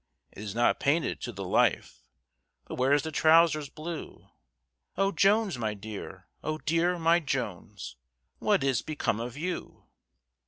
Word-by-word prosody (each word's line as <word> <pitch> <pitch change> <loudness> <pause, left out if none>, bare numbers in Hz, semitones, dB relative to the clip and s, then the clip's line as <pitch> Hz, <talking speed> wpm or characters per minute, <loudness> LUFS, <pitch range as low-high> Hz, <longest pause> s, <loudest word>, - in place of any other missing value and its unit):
"It - - -11
is 105 -1 -6
not 120 +1 +3
painted 155 +4 +1
to - - -4
the - - -6
life, - - +1 0.6
For - - -6
where's 135 +3 +3
the 160 - -4
trowsers 155 -1 +4
blue? 160 +2 -8 0.7
Oh 195 +1 +2
Jones, 200 - +2
my 110 -2 -1
dear! 105 0 -8 0.2
Oh 155 0 -2
dear! 165 +3 +1
my 165 +1 +4
Jones, 105 - -4 0.4
What - - +2
is 135 -4 +1
become 130 -8 -2
of 120 +3 -5
you?" 180 +4 -5
150 Hz, 145 wpm, -28 LUFS, 115-165 Hz, 0.7 s, trowsers